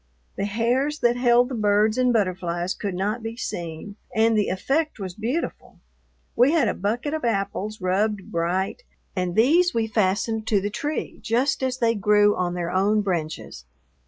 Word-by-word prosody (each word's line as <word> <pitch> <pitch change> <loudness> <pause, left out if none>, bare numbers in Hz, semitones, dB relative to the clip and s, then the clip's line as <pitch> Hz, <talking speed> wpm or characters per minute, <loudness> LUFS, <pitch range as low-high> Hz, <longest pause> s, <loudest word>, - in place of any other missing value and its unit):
The - - -2
hairs 245 +8 0
that 240 0 +3
held 245 0 +4
the - - -5
birds 215 -1 +2
and 250 -1 +2
butterflies 185 -4 -1
could 200 -3 -4
not 210 +5 -1
be 225 +1 -6
seen, 175 0 -6 0.2
and 225 +1 +3
the 210 -1 +2
effect 285 - -1
was 190 -4 -5
beautiful. 240 - -4 0.6
We 250 +6 +4
had 305 -8 +3
a - - +1
bucket 235 +9 -2
of 315 - -3
apples 210 -1 -2
rubbed 195 +2 0
bright, 180 - -1 0.3
and 180 -2 -2
these 325 +10 +4
we 230 -1 +2
fastened 215 +1 0
to 210 -3 +3
the 205 +2 -3
tree 295 +8 -4
just 265 +5 0
as 260 -1 -1
they 230 -2 +2
grew 210 0 +3
on 180 -1 -1
their 175 -1 -3
own 200 +3 +2
branches. 165 - -4
215 Hz, 170 wpm, -24 LUFS, 190-240 Hz, 0.6 s, held